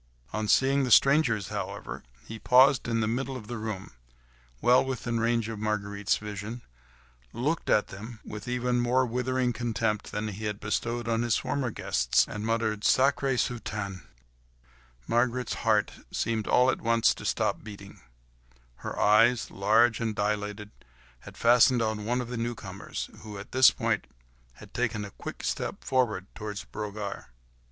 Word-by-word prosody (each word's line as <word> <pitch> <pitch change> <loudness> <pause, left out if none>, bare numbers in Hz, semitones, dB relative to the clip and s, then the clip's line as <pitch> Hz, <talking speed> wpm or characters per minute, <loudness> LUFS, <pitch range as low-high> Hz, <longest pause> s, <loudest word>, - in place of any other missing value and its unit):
On 105 +1 -2
seeing 135 +5 +3
the 130 - -1
strangers, 130 - +4
however, - - -5 0.2
he 110 0 -8
paused 130 +4 +5
in 115 -1 0
the 110 - +1
middle 130 +3 -2
of 110 - -10
the 120 +1 -5
room, 105 -3 -5 0.7
well 125 - +5
within 120 -3 -2
range 115 -1 +1
of 110 -2 -5
Marguerite's 105 -2 -1
vision, 105 +3 -6 0.7
looked 145 +9 -1
at 105 - +3
them, 110 +4 -9
with 105 0 -8
even 125 0 0
more 125 +2 +2
withering 125 +1 0
contempt 110 -3 -2
than 105 +1 -3
he 105 +2 -6
had 105 -1 -3
bestowed 115 +2 -2
upon 115 0 +1
his 120 -2 +2
former 135 -3 -2
guests, - - +1
and 105 +1 -5
muttered, 110 -2 0
"Sacrrrée 135 +2 +3
soutane!" 105 -6 -3 1.0
Marguerite's 120 - 0
heart - - +2 0.2
seemed 110 -2 -1
all 125 +1 +4
at - - -5
once 115 0 +3
to - - -11
stop - - -1
beating; 100 -2 -11 0.8
her - - -6
eyes, 115 +3 +4
large 110 +4 +3
and 115 -2 -2
dilated, 105 0 -2 0.5
had - - -13
fastened 120 +1 +5
on 110 -1 -2
one 120 +3 0
of 120 - -6
the 125 - -4
newcomers, 115 0 -5
who, 105 -2 -9
at 100 - -10
this 130 0 +7
point, - - -1 0.5
had - - -15
taken 105 -1 -1
a 100 - -9
quick - - -8
step - - -3
forward 120 -8 0
towards 105 -2 -6
Brogard. 105 -1 -6
115 Hz, 155 wpm, -28 LUFS, 105-125 Hz, 1.0 s, this